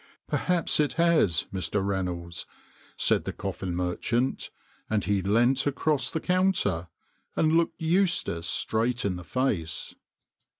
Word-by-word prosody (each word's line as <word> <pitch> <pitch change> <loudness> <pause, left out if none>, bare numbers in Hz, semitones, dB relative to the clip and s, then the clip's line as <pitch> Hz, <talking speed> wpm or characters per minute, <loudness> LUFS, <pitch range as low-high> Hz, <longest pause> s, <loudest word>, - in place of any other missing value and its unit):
"Perhaps 175 -4 +1
it 150 -2 +2
has, 165 - +3
Mr. 95 +1 -1
Reynolds," 90 -3 -3 0.5
said - - +2
the - - -2
coffin 90 -2 -4
merchant, 105 +8 -1 0.4
and 110 -2 0
he 100 -1 +1
leant 120 +8 +2
across 140 -2 +1
the 160 - -2
counter 180 - +1 0.5
and 155 - +3
looked 170 +1 +1
Eustace 165 - +1
straight 115 +5 0
in 95 -2 0
the 90 - -7
face. 95 -8 -2
115 Hz, 125 wpm, -27 LUFS, -, 0.5 s, has